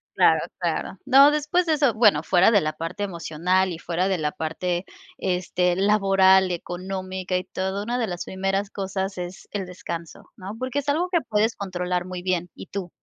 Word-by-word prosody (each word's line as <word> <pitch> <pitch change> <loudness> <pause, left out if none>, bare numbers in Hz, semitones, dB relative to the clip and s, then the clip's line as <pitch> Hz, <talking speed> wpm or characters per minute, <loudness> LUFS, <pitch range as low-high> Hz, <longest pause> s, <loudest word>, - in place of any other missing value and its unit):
claro, - - +5 0.2
claro. - - -2
No, 275 +2 +7
después 300 +4 +1
de 320 - +2
eso 285 -5 +3
bueno, 210 -9 +4
fuera 180 +3 +4
de 210 -3 +4
la 155 -1 -1
parte 165 +6 -5
emocional 180 0 0
y - - -6
fuera 175 +2 -1
de 190 -1 +1
la 150 -2 -1
parte, 175 +4 -3 0.3
este, 180 -1 0
laboral 195 -1 +4
y - - -1
económica 185 +1 -4
y 180 - 0
todo. 190 +2 -3
Una 240 +3 -2
de 235 -3 0
las 175 -2 -4
primeras 195 +1 -2
cosas 195 -1 -4
es 180 +1 -7
el 200 -2 -3
descanso, 170 -2 -8
¿no?, 195 +1 -7
porque 255 +3 -2
es 285 - -7
algo 325 +5 +1
que 345 - +3
puedes 220 +1 +1
controlar 180 -2 -2
muy 185 -1 -6
bien, 180 -1 -1
y - - -10
tú 190 -3 -5
190 Hz, 195 wpm, -24 LUFS, 180-210 Hz, 0.3 s, No